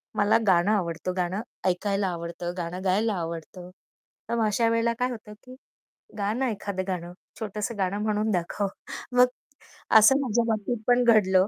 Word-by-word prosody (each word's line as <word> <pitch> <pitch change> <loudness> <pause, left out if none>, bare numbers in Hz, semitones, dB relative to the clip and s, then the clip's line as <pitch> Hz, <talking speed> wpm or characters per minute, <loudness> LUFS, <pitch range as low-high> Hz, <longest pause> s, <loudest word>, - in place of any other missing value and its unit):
"मला 205 +1 +4
गाणं 185 +2 +4
आवडतं, 180 -2 -1
गाणं 180 +4 -1 0.3
ऐकायला 195 +2 0
आवडतं, 170 0 -4
गाणं 175 +2 -4
गायला 205 +4 +2
आवडतं." 170 +1 -6 0.6
तर 235 - 0
मग 225 -2 +2
अशा 225 +2 +2
वेळेला 230 0 +1
काय 250 +1 +1
होतं, 220 -3 -8
की 255 0 -12 0.6
"गा 200 0 0
ना 255 +1 0
एखादं 200 -2 -4
गाणं, 175 -2 -4 0.3
छोटंसं 215 0 -4
गाणं 195 +2 -1
म्हणून 215 0 0
दाखव." 185 +3 -1 0.5
मग 250 - +8 0.7
असं 265 +6 +6
माझ्या 240 -3 +1
बाबतीत 220 +1 -1
पण 245 0 +4
घडलं. 190 -5 +4
205 Hz, 155 wpm, -26 LUFS, 180-225 Hz, 0.7 s, मग